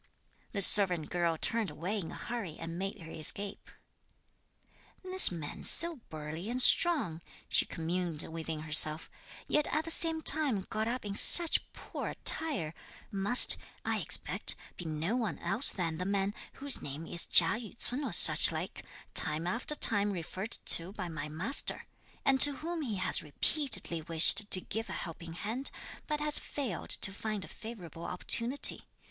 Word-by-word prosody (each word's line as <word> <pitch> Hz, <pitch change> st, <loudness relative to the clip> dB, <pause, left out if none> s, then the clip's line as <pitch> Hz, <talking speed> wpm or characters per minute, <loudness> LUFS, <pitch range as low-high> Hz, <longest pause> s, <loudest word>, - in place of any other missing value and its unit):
This 200 Hz, -3 st, +3 dB
servant 180 Hz, -6 st, +4 dB
girl 170 Hz, -2 st, -3 dB
turned 225 Hz, +4 st, -3 dB
away 190 Hz, +7 st, -7 dB
in 165 Hz, -, -8 dB
a -, -, -11 dB
hurry 225 Hz, -10 st, -8 dB
and 165 Hz, +1 st, -9 dB
made 195 Hz, 0 st, -7 dB
her 165 Hz, 0 st, -13 dB
escape. 200 Hz, +6 st, -2 dB, 1.3 s
"This 370 Hz, 0 st, +7 dB
man 160 Hz, -4 st, -10 dB
so 335 Hz, -1 st, +5 dB
burly 155 Hz, +5 st, -9 dB
and 250 Hz, +1 st, -5 dB
strong," 255 Hz, -, +3 dB, 0.3 s
she -, -, +4 dB
communed 165 Hz, -1 st, -5 dB
within 160 Hz, -1 st, -9 dB
herself, 155 Hz, 0 st, 0 dB, 0.4 s
"yet 300 Hz, 0 st, -1 dB
at 310 Hz, +1 st, -4 dB
the 330 Hz, -, +2 dB
same 325 Hz, -1 st, -4 dB
time 290 Hz, -10 st, +3 dB
got 220 Hz, +1 st, -4 dB
up 240 Hz, -1 st, -6 dB
in 200 Hz, -, -7 dB
such 335 Hz, +10 st, +3 dB
poor -, -, -10 dB
attire, 280 Hz, -, 0 dB, 0.4 s
must, 205 Hz, +5 st, +3 dB, 0.3 s
I -, -, -3 dB
expect, -, -, -1 dB, 0.2 s
be 175 Hz, -, -11 dB
no 160 Hz, +7 st, -5 dB
one 220 Hz, -, -5 dB
else 260 Hz, -, +1 dB
than 165 Hz, -4 st, -6 dB
the 180 Hz, -, -5 dB
man, 200 Hz, 0 st, -3 dB, 0.2 s
whose 280 Hz, 0 st, -3 dB
name 145 Hz, +3 st, -9 dB
is 170 Hz, +1 st, -6 dB
Chia -, -, +5 dB
Yü 230 Hz, -1 st, -13 dB
ts'un 255 Hz, +5 st, -8 dB
or 260 Hz, -, -6 dB
such -, -, +9 dB
like, -, -, -8 dB, 0.3 s
time 155 Hz, +2 st, +3 dB
after 235 Hz, +11 st, -5 dB
time 205 Hz, -6 st, +1 dB
referred 190 Hz, +4 st, -7 dB
to 170 Hz, +3 st, +1 dB
by 180 Hz, -4 st, -8 dB
my 150 Hz, -2 st, -8 dB
master, 170 Hz, -, -2 dB, 0.4 s
and 270 Hz, -1 st, +2 dB
to 290 Hz, -, +11 dB
whom 330 Hz, +3 st, -7 dB
he 235 Hz, -8 st, -6 dB
has 185 Hz, -, +2 dB
repeatedly 175 Hz, -, -2 dB
wished 165 Hz, +6 st, +3 dB
to 185 Hz, -, +6 dB
give 225 Hz, +4 st, -7 dB
a -, -, -7 dB
helping 165 Hz, -1 st, -9 dB
hand, 225 Hz, +10 st, -6 dB, 0.4 s
but 300 Hz, -1 st, -4 dB
has 300 Hz, 0 st, +1 dB
failed 250 Hz, -, -8 dB
to 195 Hz, -, -1 dB
find 210 Hz, -1 st, -7 dB
a -, -, -15 dB
favourable 180 Hz, -8 st, -12 dB
opportunity. 235 Hz, +8 st, +1 dB
200 Hz, 165 wpm, -28 LUFS, 165-250 Hz, 1.3 s, to